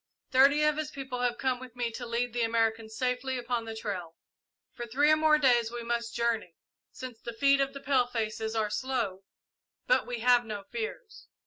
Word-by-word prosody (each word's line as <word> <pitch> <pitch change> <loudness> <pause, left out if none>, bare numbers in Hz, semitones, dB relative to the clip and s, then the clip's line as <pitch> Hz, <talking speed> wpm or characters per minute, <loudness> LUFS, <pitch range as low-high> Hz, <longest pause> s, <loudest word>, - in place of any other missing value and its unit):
Thirty 280 +3 +5
of 300 0 +3
his 310 -1 -2
people 265 -3 -6
have 245 -1 0
come 255 +1 0
with 255 -2 -11
me 240 -1 -2
to 240 +2 -6
lead 235 +1 -1
the 240 - -1
Americans 225 -1 0
safely 255 +1 -1
upon 240 -1 -2
the 225 0 -6
trail. 180 -6 -5 0.6
For 240 -2 -6
three 285 +6 +3
or - - +7
more 310 0 +4
days 245 -5 +3
must 235 -1 -3
we - - -5
journey, 225 -8 -1 0.4
since 255 -3 -8
the 235 - -6
feet 275 +4 +4
of 275 0 0
the 275 - -7
palefaces 230 -5 0
are 215 -2 0
slow, 235 -8 -2 0.6
but - - +2
we 240 -2 -4
have 245 0 +5
no 210 -3 -6
fears. 440 - -7
245 Hz, 195 wpm, -29 LUFS, 225-265 Hz, 0.6 s, or